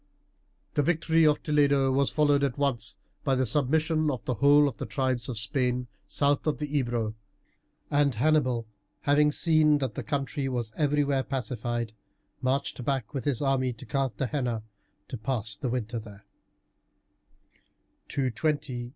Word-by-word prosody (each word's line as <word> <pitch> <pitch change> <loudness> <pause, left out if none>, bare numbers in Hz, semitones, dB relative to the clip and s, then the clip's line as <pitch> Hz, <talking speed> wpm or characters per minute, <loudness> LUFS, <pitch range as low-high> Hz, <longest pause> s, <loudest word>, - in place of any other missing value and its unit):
The - - +2
victory 165 +1 +3
of 150 -1 +2
Toledo 140 -3 +3
was 135 +1 +2
followed 145 -2 +2
at 135 -2 0
once 140 -3 -1 0.3
by 135 -2 +2
the 130 0 +1
submission 155 +5 +1
of 130 -6 -4
the 125 - 0
whole 145 +4 +5
of 125 -7 -4
the - - -5
tribes 130 +1 -1
of 120 - -3
Spain 125 +3 +1 0.2
south 145 +1 +1
of 155 - +1
the 150 0 -4
Ebro, 120 -5 0 0.8
and 145 -3 +2
Hannibal, 130 -3 +2 0.4
having 150 +1 +4
seen 155 -1 +4
that 130 -6 -2
the - - -4
country 140 -1 -2
was 120 -4 -3
everywhere 145 -2 +1
pacified, 120 -4 -3 0.5
marched 130 -1 -1
back 135 -1 -2
with 135 -1 -4
his 145 -2 0
army 130 -2 +1
to 115 - -12
Carthagena 130 -3 -1 0.4
to 130 - -5
pass 110 -4 -2
the 125 +5 -3
winter 120 -1 -2
there 105 -2 -13 1.8
(220 130 -2 -1
219 130 -3 -2
B.C.). - - -12
135 Hz, 150 wpm, -28 LUFS, 120-145 Hz, 1.8 s, whole